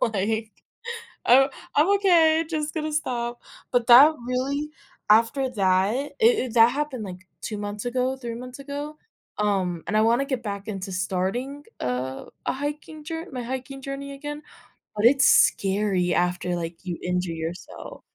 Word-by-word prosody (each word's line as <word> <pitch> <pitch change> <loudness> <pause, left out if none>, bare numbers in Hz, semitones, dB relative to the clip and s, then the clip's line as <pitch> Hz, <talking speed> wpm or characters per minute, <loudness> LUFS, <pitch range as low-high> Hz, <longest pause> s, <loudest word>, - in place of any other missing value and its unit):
like 220 0 -1 0.7
"I 270 +3 +6 0.3
I'm 300 +5 +4
okay, 330 -5 +4
just 310 -1 -3
gonna 310 -1 -2
stop." 240 -5 -2 0.3
But 245 -2 +1
that 270 +6 +9 0.2
really, 275 +4 -1 0.4
after 235 +5 +4
that, 195 -2 +2
i 280 +3 -3
it 440 - +3
that 230 0 +7
happened 280 -5 -3
like 185 -1 -9
2 215 - -5
months 205 +1 -5
ago, 255 +1 0
3 240 -3 -6
months 250 +2 -9
ago. 290 +2 -6 0.4
Um, 190 -5 0
and 215 - -1
I 215 - +5
wanna 235 +5 +3
get 260 -3 -2
back 200 -1 -5
into 195 -2 -5
starting, 195 +10 -2 0.2
uh, 125 +1 -3 0.2
a - - +1
hiking 295 +2 -6
jour 325 +2 -5
my 250 -2 -4
hiking 260 +2 -5
journey 275 +1 -6
again, 295 +2 -7 0.5
but 210 - -1
it's 270 +2 +5
scary 195 -2 +3
after, 180 0 0
like, 165 0 -6
you 175 -2 -3
injure 180 -1 -1
yourself. 165 - -7
240 Hz, 155 wpm, -25 LUFS, 195-280 Hz, 0.7 s, that